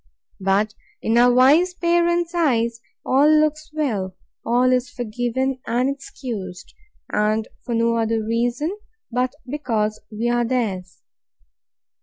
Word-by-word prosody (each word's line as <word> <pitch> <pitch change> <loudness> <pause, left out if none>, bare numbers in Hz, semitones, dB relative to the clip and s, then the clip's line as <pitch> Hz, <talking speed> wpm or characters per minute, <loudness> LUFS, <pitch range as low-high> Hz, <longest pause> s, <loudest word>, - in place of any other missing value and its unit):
But, 200 +2 +1 0.3
in 225 - +1
our 245 +1 +6
wise 295 +9 +5
parents' 345 0 +1
eyes, 235 -9 +1 0.2
all 280 +3 +4
looks 310 0 +2
well, 215 -12 -2 0.3
all 245 +2 +3
is 250 0 +1
forgiven 245 +3 -2
and 250 +4 +1
excused; 210 -9 -7 0.4
and 215 +1 +1 0.2
for 240 - -2
no 230 0 +2
other 225 -1 0
reason, 240 - -1 0.4
but 250 +3 0
because 225 -6 -1
we 220 +3 -2
are 240 0 +2
theirs. 210 -8 -2
245 Hz, 120 wpm, -22 LUFS, 220-280 Hz, 0.4 s, our